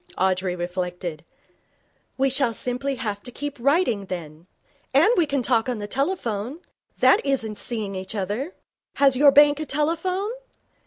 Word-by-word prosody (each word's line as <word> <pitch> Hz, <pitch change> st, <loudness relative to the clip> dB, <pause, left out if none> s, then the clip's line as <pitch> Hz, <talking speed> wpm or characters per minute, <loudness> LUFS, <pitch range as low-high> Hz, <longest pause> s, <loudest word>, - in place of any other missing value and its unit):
Audrey 185 Hz, -1 st, +1 dB
reflected. 175 Hz, -2 st, -4 dB, 0.9 s
'We 270 Hz, 0 st, +2 dB
shall 250 Hz, -3 st, +1 dB
simply 260 Hz, +3 st, -2 dB
have 210 Hz, -5 st, -4 dB
to 245 Hz, -, -5 dB
keep 290 Hz, +3 st, -5 dB
writing, 270 Hz, -, +2 dB
then. 165 Hz, -2 st, -7 dB, 0.5 s
And 460 Hz, -, +6 dB
we 335 Hz, -3 st, +3 dB
can 275 Hz, -2 st, -1 dB
talk 235 Hz, 0 st, +1 dB
on 245 Hz, -, -1 dB
the 205 Hz, -, -5 dB
telephone. 260 Hz, -, -2 dB, 0.4 s
That 405 Hz, -, +5 dB
isn't 225 Hz, -6 st, -1 dB
seeing 215 Hz, -4 st, -2 dB
each 190 Hz, +3 st, -6 dB
other. 210 Hz, -, -3 dB, 0.4 s
Has 275 Hz, -2 st, +4 dB
your 285 Hz, +3 st, +7 dB
bank 290 Hz, +1 st, +6 dB
a 310 Hz, -, -3 dB
telephone?' 340 Hz, +7 st, 0 dB
245 Hz, 150 wpm, -24 LUFS, 195-285 Hz, 0.9 s, your